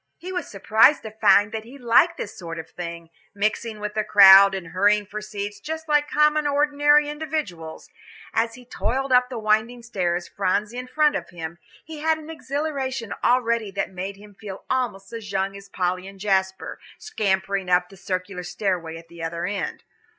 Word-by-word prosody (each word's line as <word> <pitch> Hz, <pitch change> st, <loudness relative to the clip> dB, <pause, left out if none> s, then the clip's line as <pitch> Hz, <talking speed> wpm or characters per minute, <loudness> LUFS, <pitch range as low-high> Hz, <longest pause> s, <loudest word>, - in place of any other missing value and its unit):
He 365 Hz, +2 st, -8 dB
was 360 Hz, -4 st, -3 dB
surprised 220 Hz, +8 st, +4 dB
to 220 Hz, -, -7 dB
find 210 Hz, -1 st, +4 dB
that 220 Hz, -1 st, -4 dB
he 245 Hz, +5 st, -13 dB
liked 240 Hz, -3 st, +3 dB
this 205 Hz, -, -6 dB
sort 165 Hz, -2 st, -7 dB
of 160 Hz, -, -8 dB
thing, 170 Hz, -1 st, -7 dB, 0.2 s
mixing 215 Hz, +2 st, -1 dB
with 210 Hz, 0 st, -5 dB
a 215 Hz, -, +1 dB
crowd 195 Hz, -1 st, +8 dB
and 180 Hz, -4 st, -6 dB
hurrying 205 Hz, +3 st, +2 dB
for 210 Hz, +1 st, -6 dB
seats 205 Hz, -1 st, -6 dB
just 320 Hz, +7 st, -6 dB
like 295 Hz, -1 st, +2 dB
common 300 Hz, 0 st, +3 dB
ordinary 290 Hz, +1 st, +3 dB
individuals. 295 Hz, -, -5 dB, 0.5 s
And 225 Hz, -, +3 dB
as 230 Hz, -, -14 dB
he 250 Hz, 0 st, -14 dB
toiled 265 Hz, +2 st, -2 dB
up 250 Hz, 0 st, +4 dB
the 250 Hz, -, -5 dB
winding 220 Hz, +2 st, 0 dB
stairs, 180 Hz, -6 st, -2 dB
Phronsie 205 Hz, +5 st, -1 dB
in 255 Hz, -, -7 dB
front 300 Hz, +2 st, +2 dB
of -, -, -4 dB
him, 170 Hz, -1 st, -7 dB, 0.3 s
he 320 Hz, -2 st, -8 dB
had 320 Hz, +1 st, +1 dB
an 315 Hz, 0 st, -9 dB
exhilaration 275 Hz, -6 st, -3 dB
already 235 Hz, -3 st, +2 dB
that 195 Hz, -, -2 dB
made 190 Hz, +2 st, -5 dB
him 205 Hz, 0 st, -15 dB
feel 195 Hz, -1 st, -9 dB
almost 235 Hz, -6 st, -2 dB
as 220 Hz, -3 st, -7 dB
young 195 Hz, 0 st, -1 dB
as 200 Hz, 0 st, -12 dB
Polly 185 Hz, 0 st, -2 dB
and 195 Hz, 0 st, -12 dB
Jasper, 190 Hz, -1 st, -1 dB, 0.2 s
scampering 195 Hz, -, -1 dB
up 180 Hz, 0 st, +3 dB
the 195 Hz, -, -14 dB
circular 185 Hz, 0 st, -4 dB
stairway 175 Hz, -3 st, -3 dB
at 165 Hz, 0 st, -13 dB
the 170 Hz, 0 st, -12 dB
other 170 Hz, +1 st, -3 dB
end. 195 Hz, -4 st, -4 dB
210 Hz, 185 wpm, -23 LUFS, 190-255 Hz, 0.5 s, crowd